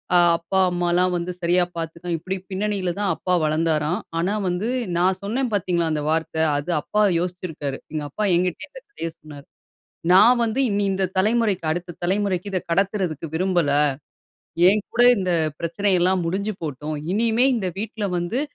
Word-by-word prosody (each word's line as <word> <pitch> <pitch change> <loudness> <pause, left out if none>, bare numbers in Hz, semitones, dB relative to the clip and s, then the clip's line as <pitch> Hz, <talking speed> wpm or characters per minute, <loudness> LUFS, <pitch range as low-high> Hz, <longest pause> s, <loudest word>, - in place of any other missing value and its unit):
அ - - +7 0.2
அப்பா 175 +3 -1
அம்மாலாம் 175 +1 +1
வந்து 175 +1 -2
சரியா 175 +1 +3
பாத்துக்க 170 +1 -6
இப்டி 185 +4 -4 0.2
பின்னணியில 195 -2 -1
தான் 205 -1 0
அப்பா 180 - -2
வளந்தாராம். 155 +3 +1 0.2
ஆனா 180 +5 0
வந்து, 180 +4 -1 0.3
நான் 185 +1 +2
சொன்னேன் 235 +5 -2
பாத்தீங்களா 175 -4 0
அந்த 150 - -1
வார்த்த, 160 0 -1 0.2
அது 145 +4 -5
அப்பா 210 - 0 0.2
யோசிச்சிருக்காரு. 170 -6 -4
எங்க 155 -1 -3
அப்பா 210 +9 -3
என்கிட்டயே 180 0 -1
இந்த - - -12
கதைய 165 - -5
சொன்னாரு. 145 -2 -12 0.7
நான் 240 +6 +7
வந்து, 230 +3 -1
இனி 205 0 0
இந்த 190 0 0
தலைமுறைக்கு 210 -3 +1
அடுத்த 175 +1 -4
தலைமுறைக்கு 195 0 0
இத 185 - 0
கடத்துறதுக்கு 185 -4 -1
விரும்பல. 175 -3 +1 1.0
என் 210 +1 +1
கூட 240 - +3 0.2
இந்த 185 -2 0 0.2
பிரச்சனை 190 +4 0
எல்லாம் 185 0 +2
முடிஞ்சு 200 +3 -2
போட்டும். 150 +1 -4 0.2
இனிமே 230 +3 +2
இந்த 190 -4 -1
வீட்ல 215 -1 -3
வந்து 175 +9 -2
180 Hz, 155 wpm, -23 LUFS, 170-205 Hz, 1.0 s, அ